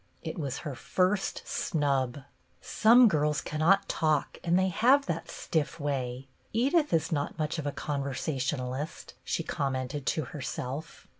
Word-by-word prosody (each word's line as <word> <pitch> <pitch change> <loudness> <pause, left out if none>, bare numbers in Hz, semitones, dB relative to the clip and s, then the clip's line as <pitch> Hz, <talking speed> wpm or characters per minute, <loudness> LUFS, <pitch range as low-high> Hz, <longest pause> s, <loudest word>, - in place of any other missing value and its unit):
It 160 +1 -5
was 140 -4 -2
her 145 - -3
first 185 +8 0
snub. 140 -5 0 0.2
" - - -39
Some 235 +3 +6
girls 150 -5 +2
cannot 175 +8 +2
talk, 155 -3 0
and 175 0 +3
they 190 0 +3
have 260 +9 +4
that 165 0 -3
stiff 160 +1 -2
way. 135 -3 -3 0.3
Edith 280 +7 +2
is 160 -1 +1
not 145 -2 -1
much 155 +1 -1
of 145 - -3
a - - 0
con 145 0 -3
versationalist," 135 0 -3
she - - -1
commented 130 0 -2
to 155 - +1
herself. 135 +3 -6
150 Hz, 150 wpm, -29 LUFS, 140-175 Hz, 0.3 s, Some